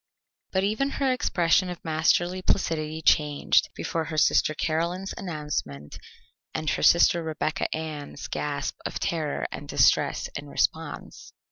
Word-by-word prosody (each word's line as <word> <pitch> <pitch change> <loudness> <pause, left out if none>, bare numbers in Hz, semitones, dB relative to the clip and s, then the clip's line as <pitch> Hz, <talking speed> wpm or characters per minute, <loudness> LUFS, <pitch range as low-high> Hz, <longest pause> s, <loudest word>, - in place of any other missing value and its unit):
But 190 0 +1
even 220 +8 0
her 270 -2 +2
expression 180 -6 +2
of 180 - -8
masterly 175 +3 +1
placidity 160 -4 -1
changed 150 -1 +3
before 165 -1 -2
her 155 0 -5
sister 155 0 +3
Caroline's 170 +5 -1
announcement 150 - -5 0.6
and 155 - -3
her - - -2
sister 170 0 +5
Rebecca 160 -1 -2
Ann's 155 -3 -5
gasp 145 -1 -3
of - - -4
terror 155 -3 -2
and - - -7
distress - - +3
in - - -6
response. - - -3
160 Hz, 130 wpm, -26 LUFS, 155-180 Hz, 0.6 s, sister